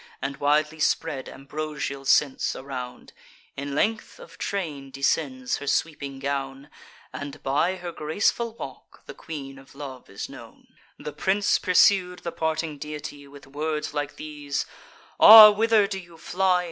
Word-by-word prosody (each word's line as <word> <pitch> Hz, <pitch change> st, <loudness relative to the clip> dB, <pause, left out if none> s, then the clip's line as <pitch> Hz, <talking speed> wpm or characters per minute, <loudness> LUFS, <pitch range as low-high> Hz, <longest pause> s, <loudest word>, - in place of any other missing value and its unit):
And 140 Hz, 0 st, -4 dB
widely 150 Hz, +2 st, +1 dB
spread 155 Hz, -3 st, -1 dB
ambrosial 140 Hz, -1 st, -5 dB
scents 135 Hz, 0 st, +2 dB
around: 130 Hz, -2 st, -8 dB, 0.4 s
In 140 Hz, 0 st, -5 dB
length 215 Hz, +7 st, -1 dB
of 165 Hz, -1 st, -14 dB
train 155 Hz, -9 st, -4 dB
descends 135 Hz, -2 st, -1 dB
her 140 Hz, -, -8 dB
sweeping 140 Hz, -3 st, -2 dB
gown; 135 Hz, +1 st, -4 dB, 0.4 s
And, 145 Hz, 0 st, -8 dB
by 155 Hz, +7 st, +1 dB
her 175 Hz, -2 st, -7 dB
graceful 205 Hz, +9 st, -1 dB
walk, -, -, -11 dB
the -, -, -9 dB
Queen 135 Hz, -4 st, -8 dB
of 135 Hz, 0 st, -18 dB
Love 135 Hz, -3 st, -9 dB
is 100 Hz, -, -6 dB
known. -, -, -13 dB, 0.3 s
The 150 Hz, -, -7 dB
prince 195 Hz, +6 st, +1 dB
pursued 180 Hz, 0 st, +3 dB
the 170 Hz, -, -3 dB
parting 160 Hz, -2 st, -2 dB
deity 145 Hz, -1 st, -7 dB
With 140 Hz, 0 st, -14 dB
words 150 Hz, +2 st, -3 dB
like 145 Hz, -1 st, -3 dB
these: 145 Hz, -2 st, -4 dB, 0.5 s
"Ah! 215 Hz, -1 st, +12 dB
whither 220 Hz, 0 st, +3 dB
do 195 Hz, -1 st, -4 dB
you 175 Hz, -2 st, -14 dB
fly? 185 Hz, +1 st, +1 dB
150 Hz, 145 wpm, -25 LUFS, 140-175 Hz, 0.5 s, Ah